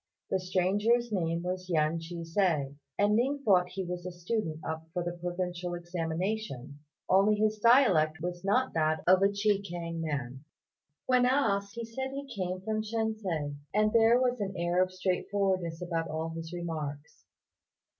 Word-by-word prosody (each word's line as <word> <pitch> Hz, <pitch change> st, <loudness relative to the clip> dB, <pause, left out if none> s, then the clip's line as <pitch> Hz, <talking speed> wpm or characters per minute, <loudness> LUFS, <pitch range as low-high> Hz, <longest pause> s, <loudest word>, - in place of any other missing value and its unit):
The 190 Hz, -, +2 dB
stranger's 205 Hz, +6 st, +1 dB
name 170 Hz, -3 st, -1 dB
was 185 Hz, 0 st, -4 dB
Yen 160 Hz, -1 st, +2 dB
Ch'ih 170 Hz, +1 st, -6 dB
hsia, 165 Hz, -6 st, +1 dB, 0.2 s
and 205 Hz, +1 st, +3 dB
Ning 275 Hz, +5 st, +1 dB
thought 180 Hz, -3 st, +4 dB
he 190 Hz, +1 st, -4 dB
was 175 Hz, 0 st, -4 dB
a 180 Hz, -, -5 dB
student 175 Hz, -2 st, -3 dB
up 160 Hz, 0 st, -4 dB
for 175 Hz, -, -1 dB
the 175 Hz, -, -2 dB
provincial 175 Hz, 0 st, -3 dB
examination, 170 Hz, -, -3 dB, 0.3 s
only 195 Hz, +3 st, +4 dB
his 215 Hz, 0 st, +1 dB
dialect 205 Hz, -, +5 dB
was 175 Hz, +1 st, -4 dB
not 250 Hz, +7 st, +2 dB
that 155 Hz, -1 st, +1 dB
of 185 Hz, +1 st, +6 dB
a 195 Hz, -, +5 dB
Chekiang 195 Hz, -5 st, -1 dB
man. 135 Hz, -4 st, -4 dB, 0.6 s
On 255 Hz, -1 st, +4 dB
being -, -, +4 dB
asked, 205 Hz, -6 st, +1 dB
he 235 Hz, 0 st, -4 dB
said 265 Hz, +4 st, -4 dB
he 280 Hz, 0 st, -4 dB
came 185 Hz, -6 st, -3 dB
from 215 Hz, +2 st, -1 dB
Shensi; 215 Hz, -10 st, -2 dB, 0.2 s
and 215 Hz, 0 st, +3 dB
there 230 Hz, +1 st, +6 dB
was 250 Hz, -1 st, +1 dB
an 195 Hz, -2 st, -3 dB
air 175 Hz, +1 st, +1 dB
of 185 Hz, 0 st, +1 dB
straightforwardness 185 Hz, -2 st, -1 dB
about 165 Hz, -2 st, -2 dB
all 160 Hz, +1 st, -3 dB
his 165 Hz, 0 st, -6 dB
remarks. 155 Hz, -4 st, -5 dB
180 Hz, 165 wpm, -30 LUFS, 165-210 Hz, 0.6 s, of